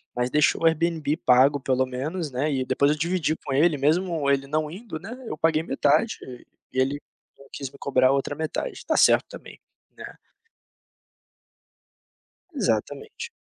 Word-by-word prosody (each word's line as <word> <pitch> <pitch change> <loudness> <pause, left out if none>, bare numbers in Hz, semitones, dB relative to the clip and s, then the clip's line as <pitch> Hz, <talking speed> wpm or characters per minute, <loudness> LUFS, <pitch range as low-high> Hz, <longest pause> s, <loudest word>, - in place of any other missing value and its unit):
mas 125 +1 0
deixou 150 +3 +2
o - - +3
Airbnb 160 -2 +1
pago 135 +2 +4
pelo 130 0 +1
menos, 145 +5 -4
né, 135 +5 -1
e 130 - 0
depois 140 +2 +2
eu 150 - -1
dividi 170 0 0
com 135 - -6
ele 155 +2 +3
mesmo 155 +1 +1
ele 140 0 0
não 155 +1 -1
indo, 190 -2 -7
né, 220 +8 -8
eu 155 - -5
paguei 160 -1 +2
metade, 150 +7 +1 0.6
e 130 - -1
ele 135 +2 +1 0.4
não 140 - -17
quis 135 -2 -6
me 140 - -15
cobrar 130 -2 +2
a - - +4
outra 140 +1 -1
metade, 160 - -3
está - - -2
certo - - +5
também, - - -12 0.4
né. - - -10 2.4
Exatamente. 450 +2 -2
150 Hz, 160 wpm, -24 LUFS, 135-165 Hz, 2.4 s, certo